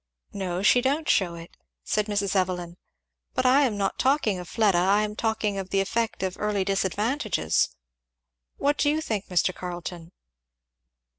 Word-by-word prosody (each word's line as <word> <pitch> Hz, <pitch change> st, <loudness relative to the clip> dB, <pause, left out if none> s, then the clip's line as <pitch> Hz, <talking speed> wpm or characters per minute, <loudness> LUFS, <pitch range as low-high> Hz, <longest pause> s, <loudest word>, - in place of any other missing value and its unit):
"No, 185 Hz, -2 st, -3 dB
she 245 Hz, +4 st, +5 dB
don't 285 Hz, +5 st, 0 dB
shew 175 Hz, -4 st, +2 dB
it," 165 Hz, 0 st, -11 dB, 0.3 s
said 210 Hz, 0 st, 0 dB
Mrs. 200 Hz, -2 st, -1 dB
Evelyn, 180 Hz, -2 st, -1 dB, 0.6 s
"but -, -, 0 dB
I 260 Hz, +3 st, +6 dB
am 220 Hz, -5 st, -1 dB
not 195 Hz, -1 st, -1 dB
talking 260 Hz, -8 st, +2 dB
of 175 Hz, -2 st, -8 dB
Fleda 205 Hz, -6 st, +3 dB
I 195 Hz, +4 st, +3 dB
am 210 Hz, 0 st, -4 dB
talking 215 Hz, -3 st, -1 dB
of 190 Hz, -1 st, -6 dB
the 195 Hz, -, +1 dB
effect 225 Hz, +1 st, -1 dB
of 185 Hz, -1 st, -2 dB
early 205 Hz, -2 st, 0 dB
disadvantages. 200 Hz, -, 0 dB, 0.9 s
What 290 Hz, +1 st, +1 dB
do 290 Hz, -, +3 dB
you 305 Hz, +1 st, +1 dB
think, 215 Hz, -10 st, -3 dB
Mr. 180 Hz, 0 st, +1 dB
Carleton?" 175 Hz, -1 st, -7 dB
200 Hz, 160 wpm, -26 LUFS, 185-225 Hz, 0.9 s, I